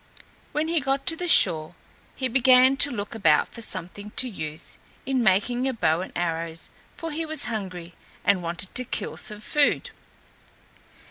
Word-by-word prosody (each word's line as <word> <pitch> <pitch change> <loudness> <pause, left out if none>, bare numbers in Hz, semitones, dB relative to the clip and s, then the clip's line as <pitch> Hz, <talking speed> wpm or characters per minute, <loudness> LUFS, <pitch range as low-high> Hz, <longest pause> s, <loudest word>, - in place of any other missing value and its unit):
When 305 +1 -1
he 335 0 +1
got 275 0 -2
to 325 - +7
the 355 +2 -4
shore 170 - +5 0.4
he 260 - -2
began 255 +1 +5
to 285 - +7
look 210 -4 -5
about 165 -9 +2
for 230 - -9
something 195 0 -5
to 255 - +4
use 160 -7 -6 0.3
in 265 -1 0
making 235 +5 +1
a 265 - -1
bow 165 -7 +1
and 185 - -7
arrows, 165 -1 -3 0.2
for 330 -1 -6
he 320 +2 -3
was 315 -2 -2
hungry 185 -6 -6 0.3
and 200 -2 +3
wanted 170 +2 -5
to 255 - +1
kill - - -5
some 210 0 -4
food. 290 +6 +1
215 Hz, 165 wpm, -24 LUFS, 175-270 Hz, 0.4 s, to